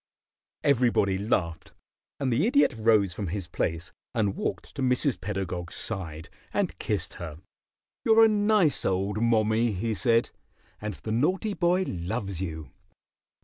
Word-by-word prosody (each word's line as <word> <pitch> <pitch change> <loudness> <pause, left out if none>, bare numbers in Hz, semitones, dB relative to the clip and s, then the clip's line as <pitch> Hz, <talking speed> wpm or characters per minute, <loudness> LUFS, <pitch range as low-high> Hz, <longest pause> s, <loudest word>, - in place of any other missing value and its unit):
Everybody 120 -8 +3
laughed, 85 -5 -1 0.5
and 130 -3 0
the 150 - +2
Idiot 280 - +4
rose 110 -4 +3
from 100 +1 -4
his 95 +2 -3
place 85 +2 -2 0.2
and 105 -4 +1
walked 90 - -4
to 140 - -5
Mrs. 125 - +1
Pedagog's 90 -3 -4
side 80 -7 -4 0.2
and - - -1
kissed - - -2
her. 80 -3 -6 0.7
"You're 225 0 +6
a - - +6
nice 210 -6 +2
old 95 +3 0
mommie," 115 0 +2
he 110 +4 -1
said, 115 +4 +2 0.5
"and 105 -2 -4
the 110 - -6
naughty 185 - +1
boy 180 0 +2
loves 95 +1 -3
you. 80 -4 -5
110 Hz, 140 wpm, -27 LUFS, 95-130 Hz, 0.7 s, You're